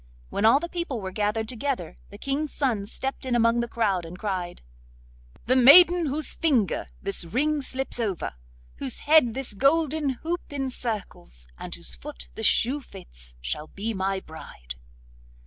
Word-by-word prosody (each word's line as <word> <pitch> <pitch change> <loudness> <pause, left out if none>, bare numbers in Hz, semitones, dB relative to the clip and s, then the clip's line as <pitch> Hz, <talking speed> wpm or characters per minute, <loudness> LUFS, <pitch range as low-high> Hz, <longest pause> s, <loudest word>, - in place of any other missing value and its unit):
When 210 - 0
all 230 +5 +6
the 340 - -4
people 340 -8 -3
were 190 -2 -5
gathered 210 +2 -1
together, 245 - -3
the 205 - -11
King's 275 +6 -2
son 230 -8 -1
stepped 265 +4 -5
in 255 -2 0
among 230 0 +3
the 235 - -1
crowd 205 -6 0
and 165 +2 -9
cried: 185 - -4 0.8
'The 255 - +3
maiden 340 +6 +8
whose 295 +2 0
finger 260 - +1 0.2
this 195 -2 -1
ring 285 - 0
slips 265 -1 -4
over, 200 - -2 0.4
whose 130 - -3
head 295 -7 +4
this 265 -5 0
golden 300 +5 +2 0.2
hoop 345 +2 -1
encircles, 230 - -5
and - - -6
whose 65 - -3
foot - - -9
this - - +1
shoe 265 +5 +2
fits, - - -10
shall 150 - -4
be 215 +6 -4
my 195 0 -1
bride. 110 - -10
230 Hz, 160 wpm, -26 LUFS, 190-275 Hz, 0.8 s, maiden